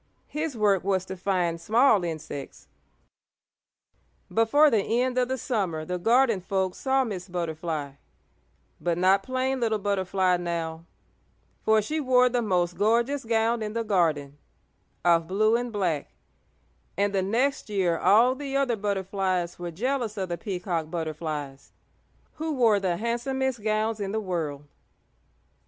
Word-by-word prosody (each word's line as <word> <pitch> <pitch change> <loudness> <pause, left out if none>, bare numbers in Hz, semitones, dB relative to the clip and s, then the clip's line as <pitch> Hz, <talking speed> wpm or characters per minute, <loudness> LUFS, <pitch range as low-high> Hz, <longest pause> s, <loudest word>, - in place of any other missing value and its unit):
His 300 -3 -3
work 205 -3 +2
was 190 -1 0
to 190 - -6
find 180 -3 -1
small 220 -1 +4
insects. 155 -4 -6 1.7
Before 285 +7 +4
the 220 - +3 0.2
end 255 0 0
of 250 - +1
the 260 +1 -2
summer 190 - -2
the 180 +2 -3
garden 230 0 +3
folk 190 0 -1
saw 265 0 +1
Miss 195 -6 -5
Butterfly, 160 -4 -3 0.9
but 170 -1 -1
not 190 +2 +4
plain 260 +4 -1
little 225 -2 +1
Butterfly 190 -2 +1
now, 165 -2 -4 0.8
for 220 -1 +3
she 310 +8 -2
wore 250 -3 +4
the 245 0 0
most 180 -4 0
gorgeous 235 +6 +1
gown 225 +1 +1
in 210 -1 -3
the 230 0 -1
garden, 155 -9 0 0.7
of 170 -1 +4
blue 215 +5 +2
and 245 0 -2
black, 180 -8 -1 0.9
and 200 0 +1
the 195 - +2
next 235 +6 0
year 185 -5 +1
all 235 +5 +5
the 275 0 -3
other 270 -4 +1
butterflies 190 -3 -2
were 175 0 -4
jealous 230 +4 -2
of 190 -2 -3
the 175 - -1
Peacock 180 -6 -3
Butterflies, 155 -4 -5 0.6
who 315 0 -2
wore 225 -5 +4
the 180 -3 -1
handsomest 240 +2 -2
gowns 215 +1 0
in 200 0 -3
the 220 - 0
world. 165 -8 -3
200 Hz, 145 wpm, -26 LUFS, 175-235 Hz, 1.7 s, all